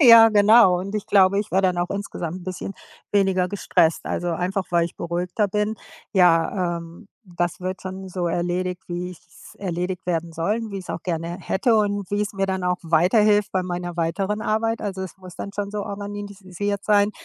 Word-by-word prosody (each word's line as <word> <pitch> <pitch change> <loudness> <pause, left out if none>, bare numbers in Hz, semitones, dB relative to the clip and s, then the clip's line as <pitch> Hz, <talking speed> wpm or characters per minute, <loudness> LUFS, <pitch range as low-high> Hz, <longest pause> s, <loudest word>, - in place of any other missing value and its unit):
Ja, 230 -4 +9
genau 210 -3 +6
und 195 +2 -6
ich 210 - -2
glaube, 195 -1 +5
ich 210 - -7
wäre 190 +1 +2
dann 180 -2 +2
auch 175 0 -1
insgesamt 185 -4 -4
'n - - -12
bisschen 185 +1 -5 0.4
weniger 190 -2 +2
gestresst, 170 -4 +1
also, 175 0 -2
einfach, 185 +3 -1
weil 170 -1 +3
ich 170 - -7
beruhigter 175 +4 -1
bin. 210 +2 -1 0.4
Ja, 175 -1 +3
ähm, 170 +5 -12 0.2
das 175 -1 -3
wird 185 +1 -4
dann 190 0 -6
so 180 -1 -2
erledigt, 180 +2 -2
wie 175 +1 -3
ich's 180 - -15
erledigt 180 -1 -3
werden 170 -1 -1
soll 170 +7 0
und 225 -2 -5
wie 200 - -4
ich's 185 - -8
auch - - -5
gerne 170 0 -3
hätte 225 +6 +1
und 205 -3 0
wie 205 0 0
es 210 0 -2
mir 195 -1 -1
dann 190 -1 -2
auch 180 0 +1
weiterhilft 200 +6 +3
bei 185 -1 +1
meiner 175 -1 -4
weiteren 195 +5 -1
Arbeit. 225 +1 0
Also, 195 -2 -4
es 190 - -7
muss 185 -1 -11
dann 200 - -6
schon 200 0 -3
so 210 0 -3
organisiert 205 -1 -5
sein. 205 -1 +4
190 Hz, 200 wpm, -23 LUFS, 175-205 Hz, 0.4 s, Ja